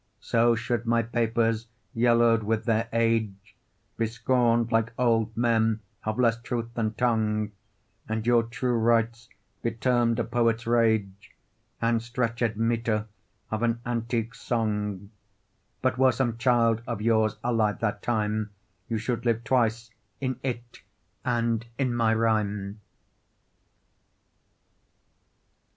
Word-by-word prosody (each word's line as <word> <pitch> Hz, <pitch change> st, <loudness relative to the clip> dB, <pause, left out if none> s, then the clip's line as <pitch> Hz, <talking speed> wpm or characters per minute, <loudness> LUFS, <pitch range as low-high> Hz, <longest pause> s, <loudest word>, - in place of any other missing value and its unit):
So 115 Hz, 0 st, +2 dB
should 115 Hz, 0 st, -2 dB
my 115 Hz, 0 st, +3 dB
papers, 115 Hz, -1 st, 0 dB, 0.3 s
yellow'd 115 Hz, -1 st, +4 dB
with 110 Hz, +1 st, -1 dB
their 115 Hz, -1 st, +1 dB
age, 110 Hz, -3 st, 0 dB, 0.4 s
Be 115 Hz, -, +1 dB
scorn'd, 115 Hz, 0 st, +1 dB
like 115 Hz, 0 st, +1 dB
old 115 Hz, -3 st, +1 dB
men 115 Hz, -2 st, +2 dB, 0.2 s
of 110 Hz, 0 st, -2 dB
less 115 Hz, -2 st, +2 dB
truth 115 Hz, 0 st, -4 dB
than 110 Hz, -2 st, -2 dB
tongue, 110 Hz, -3 st, 0 dB, 0.6 s
And 110 Hz, 0 st, -2 dB
your 120 Hz, -1 st, +5 dB
true 125 Hz, +2 st, -2 dB
rights 115 Hz, +1 st, +1 dB, 0.3 s
be 115 Hz, -, 0 dB
term'd 120 Hz, 0 st, +1 dB
a 120 Hz, -, +1 dB
poet's 115 Hz, -1 st, 0 dB
rage 110 Hz, -4 st, 0 dB, 0.4 s
And 115 Hz, 0 st, +1 dB
stretched 115 Hz, -1 st, -1 dB
metre 115 Hz, -1 st, 0 dB, 0.5 s
of 110 Hz, 0 st, -2 dB
an 115 Hz, 0 st, +1 dB
antique 115 Hz, -1 st, -2 dB
song: 105 Hz, -3 st, -2 dB, 0.7 s
But 120 Hz, -, +1 dB
were 130 Hz, -1 st, +6 dB
some 120 Hz, -2 st, -1 dB
child 115 Hz, -2 st, +3 dB
of 115 Hz, -4 st, -3 dB
yours 110 Hz, -1 st, +2 dB
alive 115 Hz, -4 st, +1 dB
that 105 Hz, -2 st, -1 dB
time, 110 Hz, -2 st, -1 dB, 0.4 s
You 115 Hz, -, 0 dB
should 115 Hz, +2 st, -2 dB
live 115 Hz, -1 st, +1 dB
twice,—in 115 Hz, +1 st, -2 dB
it, 120 Hz, -2 st, -5 dB, 0.4 s
and 115 Hz, -2 st, 0 dB
in 130 Hz, -3 st, 0 dB
my 115 Hz, -1 st, +2 dB
rhyme. 105 Hz, -2 st, 0 dB
115 Hz, 120 wpm, -27 LUFS, 110-120 Hz, 0.7 s, were